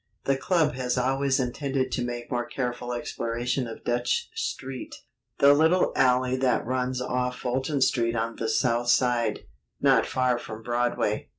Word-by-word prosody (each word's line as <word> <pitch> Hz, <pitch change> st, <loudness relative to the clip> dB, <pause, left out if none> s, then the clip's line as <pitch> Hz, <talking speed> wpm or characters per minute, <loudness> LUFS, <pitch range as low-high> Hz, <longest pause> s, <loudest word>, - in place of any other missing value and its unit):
The 135 Hz, -, +2 dB
club 160 Hz, +2 st, +1 dB
has 125 Hz, -1 st, -2 dB
always 135 Hz, +2 st, +1 dB
intended 130 Hz, +1 st, -1 dB
to 125 Hz, -, -1 dB
make 120 Hz, 0 st, -5 dB
more 120 Hz, -1 st, -1 dB
careful 125 Hz, -1 st, -3 dB
exploration 120 Hz, +1 st, -2 dB
of 115 Hz, -, -9 dB
Dutch 120 Hz, -, -1 dB
Street, 135 Hz, -, -5 dB, 0.4 s
the 140 Hz, 0 st, +7 dB
little 160 Hz, +5 st, +3 dB
alley 125 Hz, -1 st, +3 dB
that 130 Hz, -3 st, +1 dB
runs 125 Hz, +1 st, -1 dB
off 125 Hz, 0 st, -1 dB
Fulton 130 Hz, +3 st, -1 dB
Street 120 Hz, -2 st, +2 dB
on 115 Hz, 0 st, -2 dB
the 115 Hz, -, -2 dB
south 120 Hz, 0 st, +1 dB
side, 120 Hz, -4 st, +2 dB, 0.4 s
not -, -, +4 dB
far 125 Hz, -1 st, +1 dB
from 110 Hz, -1 st, -8 dB
Broadway. 120 Hz, -3 st, -1 dB
125 Hz, 155 wpm, -26 LUFS, 120-130 Hz, 0.4 s, the